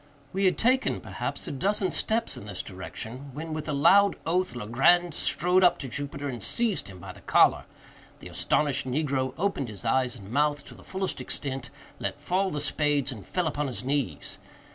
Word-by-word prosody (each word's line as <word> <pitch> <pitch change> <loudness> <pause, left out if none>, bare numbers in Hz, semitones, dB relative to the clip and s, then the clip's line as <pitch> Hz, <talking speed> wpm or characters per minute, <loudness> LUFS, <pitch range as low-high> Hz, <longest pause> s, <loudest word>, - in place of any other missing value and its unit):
We 195 +1 +1
had 185 - +3
taken, 255 +3 +2
perhaps, - - -5
a - - -3
dozen 195 +7 0
steps 225 +1 0
in - - -8
this 100 -3 -3
direction, 110 +8 -7
when, 160 +1 -5
with 155 0 -4
a - - +1
loud 200 +8 +5
oath, 175 -4 0
Legrand 135 +10 +3
strode 180 +6 +2
up 180 - +6
to 135 - -6
Jupiter, 140 +2 -4
and 125 -4 -5
seized 225 - +1
him 95 -2 -10
by 90 - -8
the - - -15
collar. - - +4 0.5
The - - -10
astonished 145 -3 +1
negro 130 -1 0
opened 170 - -1
his 105 +1 -9
eyes 125 +1 +2
and 100 -3 -11
mouth 145 +1 +1
to - - -11
the - - -15
fullest 190 0 -3
extent, 135 -4 -4 0.3
let - - -3
fall 190 +2 0
the 150 -3 -3
spades, 145 -2 +1
and 110 -6 -8
fell 180 -1 -1
upon 150 -2 -1
his 125 -1 -4
knees. 140 0 -2
145 Hz, 190 wpm, -27 LUFS, 130-180 Hz, 0.5 s, up